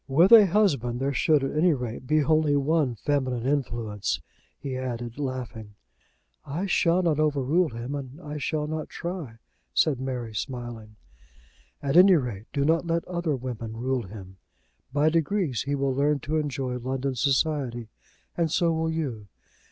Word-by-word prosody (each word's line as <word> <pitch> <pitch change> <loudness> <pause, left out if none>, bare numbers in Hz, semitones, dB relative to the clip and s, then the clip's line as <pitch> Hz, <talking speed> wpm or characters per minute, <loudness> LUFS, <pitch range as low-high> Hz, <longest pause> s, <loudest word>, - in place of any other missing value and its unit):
"With 165 +9 +4
a 220 -4 +10
husband 145 - +1
there 140 +1 0
should 145 +2 +3
at 135 - -2
any 160 +1 +4
rate 125 0 -6
be 155 0 +3
only 155 0 +3
one 140 -2 +1
feminine 130 -2 -1
influence," 115 - -1 0.4
he 135 -2 -4
added, 120 -1 -5
laughing. 125 -6 -5 0.7
"I 165 +8 -3
shall 180 -1 +2
not 160 -3 +1
over 150 -3 +1
rule 165 +6 +2
him, 120 +3 -6
and 140 0 -6
I 150 -3 -6
shall 150 +1 -1
not 155 +1 -4
try," 170 -10 -6 0.4
said 145 -6 +3
Mary, 125 -4 -4
smiling. 120 -2 -6 0.9
"At 140 +3 +2
any 185 +1 +8
rate, 120 - -3
do 140 -1 0
not 165 +2 +2
let 165 0 0
other 170 -4 -1
women 120 -3 -6
rule 125 -2 -1
him. 95 -2 -11 0.5
By 145 +3 +3
degrees 165 - 0
he 145 - +1
will 135 -1 0
learn 145 +2 +2
to 155 +4 -1
enjoy 135 -4 -2
London 130 +2 -2
society, 130 -3 0 0.5
and 165 -2 0
so 170 0 +2
will 160 0 0
you. 135 -11 -3
140 Hz, 160 wpm, -26 LUFS, 120-155 Hz, 0.9 s, a